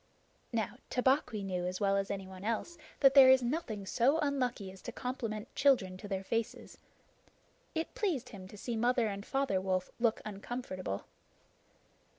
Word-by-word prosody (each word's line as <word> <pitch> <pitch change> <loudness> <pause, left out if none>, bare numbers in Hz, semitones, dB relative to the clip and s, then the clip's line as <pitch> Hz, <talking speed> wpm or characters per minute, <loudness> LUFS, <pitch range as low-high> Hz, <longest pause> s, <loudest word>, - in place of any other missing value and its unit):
Now, 225 -4 -2
Tabaqui 250 -4 +1
knew 180 -2 -2
as 185 0 -3
well 195 -1 +2
as 195 0 0
anyone 190 -1 -6
else 230 +10 -2 0.3
that 270 -1 +7
there 270 -2 +9
is 260 -1 +6
nothing 235 -7 -2
so 250 +9 +3
unlucky 255 -10 -1
as 190 -1 -14
to - - -6
compliment 230 -3 -4
children 250 -10 +3
to 205 - -8
their 195 -1 -2
faces. 230 +3 -3 1.0
It 320 +1 -2
pleased 310 - -1
him 190 -3 -9
to 210 - -12
see 235 +3 -3
Mother 240 +1 +2
and 200 -1 -4
Father 270 -7 0
Wolf 185 -1 -1
look 230 -2 +2
uncomfortable. 195 - -5
220 Hz, 160 wpm, -33 LUFS, 195-260 Hz, 1.0 s, there